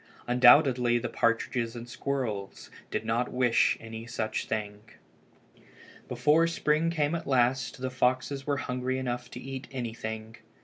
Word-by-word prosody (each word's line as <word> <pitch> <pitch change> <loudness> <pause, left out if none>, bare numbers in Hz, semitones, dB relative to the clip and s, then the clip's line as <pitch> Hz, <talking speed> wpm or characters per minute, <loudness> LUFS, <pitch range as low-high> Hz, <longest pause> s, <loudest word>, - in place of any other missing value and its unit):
Undoubtedly 125 0 +5
the 120 +1 -2
partridges 115 0 0
and 120 0 -7
the - - -16
squirrels 120 -10 -4 0.2
did - - -3
not 115 +2 0
wish 125 -2 +3
any 115 0 -8
such 110 -2 -3
thing. 105 -1 -3 1.3
Before 150 +7 +3
spring 160 -1 +1
came 155 -2 0
at 170 -1 -3
last 125 -2 +1
the 130 0 -3
foxes 130 +2 0
were 145 -1 +1
hungry 130 0 -2
enough 125 -1 -3
to 125 - -8
eat 135 +1 -7
anything. 110 -3 -5
125 Hz, 140 wpm, -28 LUFS, 115-135 Hz, 1.3 s, Undoubtedly